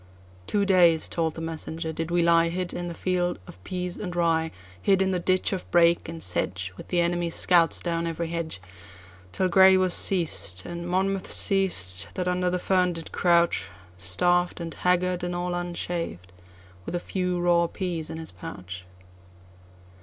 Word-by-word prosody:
"Two 205 -1 +1
days," 175 -4 +4
told 160 -2 -2
the 165 - -6
messenger, 160 0 -5
"did 165 +1 -4
we 175 0 +2
lieHid 170 +2 +2
in 175 - -4
the 170 - -6
field 180 -1 -1
of 90 -1 -14
peas 180 - -4
and 180 -4 -5
rye, 165 -2 +1 0.3
Hid 195 - +3
in 190 0 +2
the 180 - 0
ditch 185 +2 +1
of 185 - -5
brake 170 -1 +3
and 165 0 -7
sedge, 90 0 -1
With - - -11
the 175 - 0
enemy's 170 -1 0
scouts 170 -2 +4
down 170 -1 -1
every 165 0 -3
hedge, 165 - -4 0.7
Till 185 - 0
Grey 190 +1 +6
was 185 -1 +2
seized, 155 - 0
and 170 0 -6
Monmouth 190 +1 0
seized, 100 - +2
that 180 -1 -2
under 180 0 +1
the 180 - 0
fern 180 -1 +1
did 165 -1 -8
crouch, 170 -1 +2 0.3
Starved, 175 - +1
and 165 -1 -5
haggard, 180 0 +1
and 175 0 -2
all 175 0 -2
unshaved, 170 - -4 0.5
with 175 - -5
a - - 0
few 180 0 -2
raw 175 -1 +3
peas 170 -4 -4
in 160 - -6
his 160 0 -6
pouch." 90 - -9
175 Hz, 170 wpm, -26 LUFS, 165-180 Hz, 0.7 s, Grey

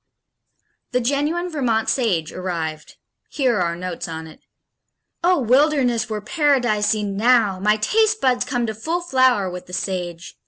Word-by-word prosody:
The 250 - +3
genuine 290 +8 0
Vermont 235 -7 0
Sage 185 - 0
arrived. 165 -4 -5 0.3
Here 255 -6 +1
are - - 0
our 170 -1 0
notes 180 0 -5
on 160 -1 -6
it: 160 - -14 0.8
Oh, 360 +1 +4
wilderness 255 -2 +2
were 215 -1 -3
Paradise 245 -6 +1
enow! 210 0 +2
My 210 +2 +2
taste 435 - +2
buds 255 -2 +2
come 245 -3 -2
to 220 - -3
full 320 +11 -3
flower 260 - +2
with 180 0 -7
the 180 - -13
Sage. 180 -2 -4
225 Hz, 150 wpm, -21 LUFS, 185-270 Hz, 0.8 s, Oh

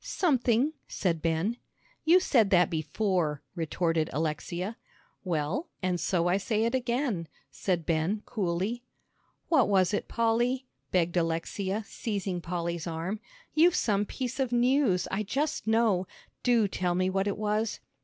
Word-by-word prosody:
"Something," 265 - +2
said 170 -4 -1
Ben. 165 +8 0 0.5
"You 340 +3 +7
said 235 - +3
that 180 -3 +4
before," 160 -1 0
retorted 165 -1 0
Alexia. 170 - -2 0.5
"Well, 175 - -1
and 180 -1 +1
so 175 -1 +1
I 180 +2 +3
say 215 +2 0
it 230 +2 +1
again," 240 - 0 0.2
said 175 -4 -1
Ben, 170 +6 0
coolly. 200 +3 -1 0.7
"What 275 -10 +4
was 190 -2 +3
it, 205 - -1
Polly?" 240 +3 +1 0.3
begged 175 -1 +1
Alexia, 180 +5 -1
seizing 200 -6 -3
Polly's 170 -1 -3
arm. 170 +6 -3 0.3
"You've 340 +3 +5
some 205 - +1
piece 260 0 -4
of 260 -3 0
news, 245 -5 +3
I 195 - 0
just 285 +7 -2
know; 220 -5 +3 0.3
do 235 -4 +3
tell 180 -2 -1
me 185 +1 +2
what 195 +1 0
it 200 - 0
is!" 215 +1 0
195 Hz, 140 wpm, -29 LUFS, 170-235 Hz, 0.7 s, You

